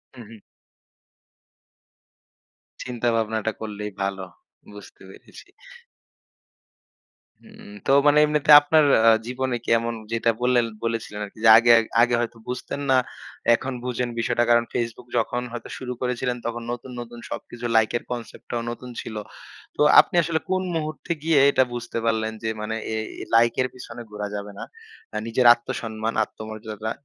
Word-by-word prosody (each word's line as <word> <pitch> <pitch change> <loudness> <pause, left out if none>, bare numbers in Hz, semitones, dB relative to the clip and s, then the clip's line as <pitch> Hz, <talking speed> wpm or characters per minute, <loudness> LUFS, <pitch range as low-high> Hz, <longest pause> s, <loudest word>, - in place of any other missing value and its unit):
হুম, 120 -2 -11
হুম। 115 - -12 2.5
চিন্তাভাবনাটা 115 -3 -1
করলেই 105 -1 -5
ভালো, 95 -1 -2 0.5
বুঝতে 105 -1 -14
পেরেছি। - - -15 2.0
হুম, - - -15 0.2
তো - - +2 0.2
মানে 145 +1 +5
এমনিতে 150 0 +2
আপনার 155 +1 +3 0.2
আ - - +10 0.2
জীবনে 125 0 -2
কি - - -6
এমন 115 0 -3 0.2
যেটা 115 0 +1
বললেন 125 -1 +3 0.2
বলেছিলেন 115 -2 -3
আরকি 100 - -16
যে - - +8
আগে 120 +1 +5 0.3
আগে 120 0 +3
হয়তো 120 0 -3
বুঝতেন 125 +3 -5
না, 130 - +5 0.6
এখন 135 +2 -5
বুঝেন 125 -1 -2
বিষয়টা। 120 +1 +1
কারণ, 120 0 +5
Facebook 120 0 -3
যখন 120 +2 0
হয়তো 120 -1 -7
শুরু 125 -1 -5
করেছিলেন, 125 0 -1
তখন 120 0 -4
নতুন, 120 +1 -7
নতুন 120 0 -10
সবকিছু 120 0 -7
লাইকের 110 +2 +2
কনসেপ্টটাও 120 0 -5
নতুন 125 +1 -9
ছিল। 110 - -8 0.6
তো - - -2 0.2
আপনি - - +3
আসলে 160 0 -1
কোন 185 0 +1
মুহূর্তে 155 +1 -4
গিয়ে 160 -3 +4
এটা 130 - +4
বুঝতে 120 -1 -5
পারলেন 110 -1 0
যে 110 - -1
মানে 110 +1 -3 0.2
এ - - -1 0.3
এ - - -9
লাইকের 120 +2 +3
পিছনে 125 -1 -10
ঘোরা 105 0 -4
যাবে 100 0 -6
না? - - -5 0.5
আ - - 0
নিজের 120 +2 +1
আত্মসম্মান, 115 -1 -5
আত্মমর্যাদা 110 0 -7
120 Hz, 145 wpm, -23 LUFS, 110-125 Hz, 2.5 s, আ